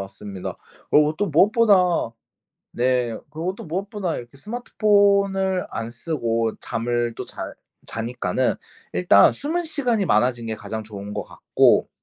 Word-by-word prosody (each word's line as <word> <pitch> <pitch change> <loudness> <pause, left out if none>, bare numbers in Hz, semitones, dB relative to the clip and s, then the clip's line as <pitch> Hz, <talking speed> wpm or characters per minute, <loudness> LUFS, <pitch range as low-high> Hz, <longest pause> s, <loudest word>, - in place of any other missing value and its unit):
맞습니다. 100 0 -7 0.3
그러고 150 +1 +4
또 205 - 0
무엇보다 185 - +3 0.6
네 125 0 +1 0.2
그러고 170 +4 -3
또 - - -10
무엇보다 190 +1 -3
이렇게 120 +2 -9
스마트폰을 200 - +2
안 115 0 -4
쓰고 115 -4 -2
잠을 120 0 -1
또 - - -5
잘 - - -7 0.3
자니까는 115 -4 -1 0.4
일단 90 +3 +5
수면 335 +5 -2
시간이 250 -10 0
많아진 120 -2 +2
게 110 -1 -3
가장 110 0 -6
좋은 105 -1 -8
것 - - -2
같고 - - +2
145 Hz, 290 characters per minute, -23 LUFS, -, 0.6 s, 일단